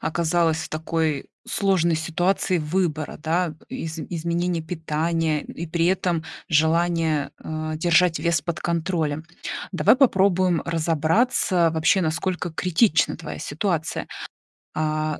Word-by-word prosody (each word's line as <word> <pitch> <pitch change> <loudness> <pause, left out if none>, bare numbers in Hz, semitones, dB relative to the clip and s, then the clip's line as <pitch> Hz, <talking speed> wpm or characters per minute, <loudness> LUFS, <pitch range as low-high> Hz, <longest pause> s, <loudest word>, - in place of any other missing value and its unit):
оказалась 165 0 +1
в - - -5
такой 155 -2 -1 0.2
сложной 185 -4 +2
ситуации 175 +3 0
выбора, 155 -1 -1
да, 165 0 0
изм 160 -1 -5
изменения 170 0 -1
питания 160 -1 -1
и 170 - -7
при 165 +1 0
этом 175 -3 0 0.2
желания, 160 -1 +2
э, 155 0 -4
держать 170 +1 +3
вес 170 -3 +1
под 170 +2 -4
контролем. 165 -3 -1 0.5
Давай - - +4
попробуем 185 - +3
разобраться, 165 - +2
вообще, 180 +5 +3
насколько 175 +2 -1
критична 175 +2 +2
твоя - - -7
ситуация. 160 +1 -2 0.7
А, 155 0 -1
165 Hz, 110 wpm, -23 LUFS, 155-175 Hz, 0.7 s, Давай